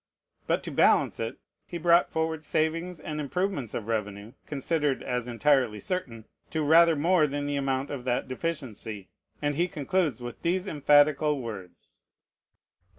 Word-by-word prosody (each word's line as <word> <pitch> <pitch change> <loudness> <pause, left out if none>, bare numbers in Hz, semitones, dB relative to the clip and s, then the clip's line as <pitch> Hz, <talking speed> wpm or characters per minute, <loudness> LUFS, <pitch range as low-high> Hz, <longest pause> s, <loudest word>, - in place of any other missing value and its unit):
But - - +1
to - - -6
balance - - +3
it, 115 0 -3 0.3
he 175 - -5
brought 170 +1 +4
forward 160 -1 -2
savings 165 +3 -1
and 150 -1 -5
improvements 165 - -2
of 110 - -4
revenue 105 -1 -3 0.2
(considered 145 0 -1
as 125 -1 -2
entirely 125 -3 +2
certain) 120 - -4 0.2
to 160 -1 -1
rather 165 +2 +6
more 160 +1 +3
than 145 0 -3
the 145 0 -2
amount 135 0 -1
of 140 -4 -5
that 125 -1 0
deficiency; 120 - -5 0.3
and 145 0 +1
he 170 +5 +1
concludes 155 -3 -1
with 120 -1 -8
these 180 +2 0
emphatical 145 -1 +3
words 105 -7 -9
(p. - - -52
145 Hz, 155 wpm, -27 LUFS, 125-165 Hz, 0.3 s, rather